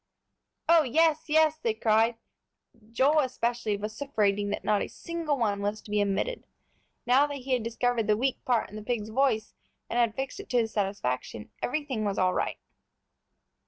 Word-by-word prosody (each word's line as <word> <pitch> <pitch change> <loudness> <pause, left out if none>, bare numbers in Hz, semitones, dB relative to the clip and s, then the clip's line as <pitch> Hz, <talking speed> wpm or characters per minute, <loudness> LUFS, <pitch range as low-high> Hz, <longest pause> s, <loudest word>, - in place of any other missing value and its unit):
"Oh, 335 -1 +7
yes, 315 +3 +2
yes!" 315 0 +3
they 225 -7 -1
cried, 225 +1 +3 0.8
Joel 275 +6 +3
especially 240 -5 -1
vociferating 210 -2 -1
that 205 - -3
not 210 -1 +2
a - - -2
single 335 -4 -3
one 205 -4 0
was 205 +1 -2
to 205 - -11
be 210 0 +2
omitted. 205 - -1 0.6
Now 260 +4 +4
that 290 - -5
he 260 0 -3
had 250 - +2
discovered 230 0 0
the 210 -1 +3
weak 260 +3 -1
part 240 -5 0
in - - -10
the - - -6
pig's 215 -1 -3
voice, 225 -3 +1 0.4
and 240 - +1
had 230 -2 +2
fixed 270 +7 -4
it 405 - -9
to 250 - +1
his 225 -2 +1
satisfaction, 190 - -3
everything 265 -5 -2
was 200 -2 -1
all 185 -1 +2
right. - - -1
235 Hz, 175 wpm, -28 LUFS, 210-275 Hz, 0.8 s, Oh